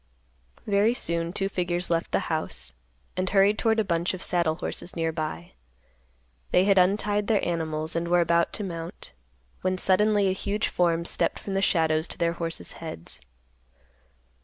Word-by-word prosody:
Very 210 +3 +3
soon 170 -5 -2
two 195 +1 -1
figures 175 -2 -2
left 165 0 0
the - - +2
house, 65 - -3 0.4
and 185 0 0
hurried 200 +1 +4
toward 225 -1 +2
a - - +3
bunch 170 -1 0
of 185 - -8
saddle 170 -3 +1
horses 175 - -4
near 165 -1 0
by. 155 - -4 1.0
They 180 - +4
had 195 -1 +5
untied 205 +2 +2
their 215 -3 +2
animals, 160 -2 -2
and 170 0 -1
were 175 +1 +4
about 170 0 +2
to 210 - -3
mount, 165 - -6 0.5
when 185 0 0
suddenly 205 +2 +3
a - - +3
huge 200 +2 -1
form 170 -1 +1
stepped - - 0
from 195 - -6
the 195 - +1
shadows 160 -3 +2
to - - -8
their 170 -1 +1
horses' 165 -1 -4
heads. 85 - -7
175 Hz, 165 wpm, -26 LUFS, 165-195 Hz, 1.0 s, had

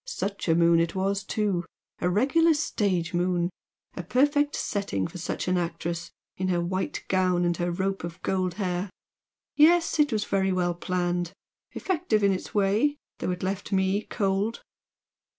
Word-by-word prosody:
Such 200 +1 -3
a 165 - +4
moon 170 0 +5
it 170 +2 0
was, 195 +1 0
too! 200 -4 -1 0.4
A 180 - +1
regular 295 - +3
stage 190 - 0
moon! 175 0 +1 0.4
A - - -3
perfect 290 - +2
setting 200 - -2
for 180 - -7
such 170 - -3
an 180 0 +2
actress, 170 0 -3 0.3
in 185 - -1
her 180 -2 +1
white 185 +2 -2
gown 185 -2 +2
and 175 0 +1
her 175 0 -1
rope 190 +2 -2
of 170 0 -6
gold 185 -2 0
hair! 185 -1 -2 0.7
Yes 330 +1 +4
it 295 -2 +4
was 215 -1 0
very 195 -1 +1
well 180 -1 +1
planned! 175 0 -2 0.4
effective 325 - 0
in 200 - +5
its 185 - -5
way, 210 +9 +2 0.2
though - - -2
it 180 0 -3
left 195 +2 -3
me 190 +1 +2
cold!" 200 +3 -1
190 Hz, 165 wpm, -27 LUFS, 175-205 Hz, 0.7 s, moon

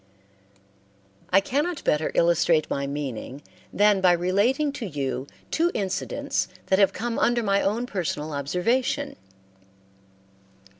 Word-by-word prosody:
I 190 - +6
cannot 295 - -1
better 150 +1 +1
illustrate 170 -2 +3
my 140 0 -1
meaning 140 -1 -5 0.3
than 205 -1 +3
by 180 -1 +5
relating 205 - +1
to 245 -6 -5
you 140 -4 -3 0.2
two 335 +2 +2
incidents 190 -2 -2 0.2
that 190 - +2
have 195 - +5
come 235 0 -3
under 240 0 +2
my 200 -1 +2
own 220 +5 0
personal 160 -8 -3
observation. 230 - -1
190 Hz, 115 wpm, -25 LUFS, 155-240 Hz, 0.3 s, I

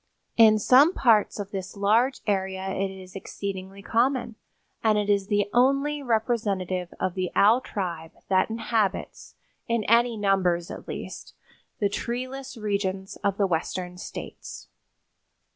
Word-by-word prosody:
In 220 -2 +7
some 270 - +5
parts 220 -4 +3
of 200 0 -5
this 195 0 -6
large 225 +7 +2
area 190 -2 -1
it 195 +1 -1
is 190 -1 -11
exceedingly 195 0 -6
common, 240 +1 +1 0.5
and 215 -1 +3
it 205 0 +1
is 200 -1 +1
the 205 -1 +1
only 275 +4 +2
representative 210 -7 -1
of 185 - -1
the 185 -1 -2
owl 220 +5 +5
tribe 170 -8 -5
that 185 +1 +2
inhabits, 220 -3 -2 0.3
in 235 -2 0
any 235 +2 +3
numbers 185 -4 +1
at - - -9
least, - - -7 0.4
the 205 - +2
treeless 255 +5 -5
regions 195 -3 -2
of 200 -1 -1
the 200 - +3
western 180 +1 -2
states. - - -8
205 Hz, 135 wpm, -26 LUFS, 190-235 Hz, 0.5 s, In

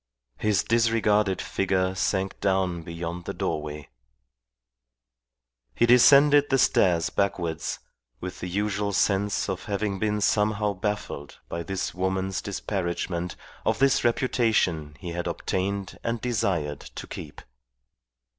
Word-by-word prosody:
His 105 -3 +2
disregarded 110 -4 +2
figure 95 -1 0
sank 95 +1 -1
down 95 -3 +1
beyond 85 +1 -6
the - - -4
doorway. 75 -1 -3 1.9
He - - +4
descended 140 +4 +6
the 135 - +3
stairs 90 -9 +3
backwards, 85 -5 -1 0.4
with 90 0 -6
the 90 - -4
usual 100 +1 -1
sense 100 +1 +1
of 95 -2 -4
having 100 -2 -2
been 105 0 0
somehow 105 0 +2
baffled 100 -7 -4
by 85 - -3
this 95 +3 -3
woman's 95 +1 -1
disparagement 90 -3 -3 0.3
of - - +1
this 135 0 +3
reputation 110 - +1
he 85 - -6
had 85 +1 -3
obtained 100 +1 -2
and 115 0 -1
desired 100 - -1
to - - -9
keep. 70 - -8
95 Hz, 120 wpm, -26 LUFS, 90-105 Hz, 1.9 s, descended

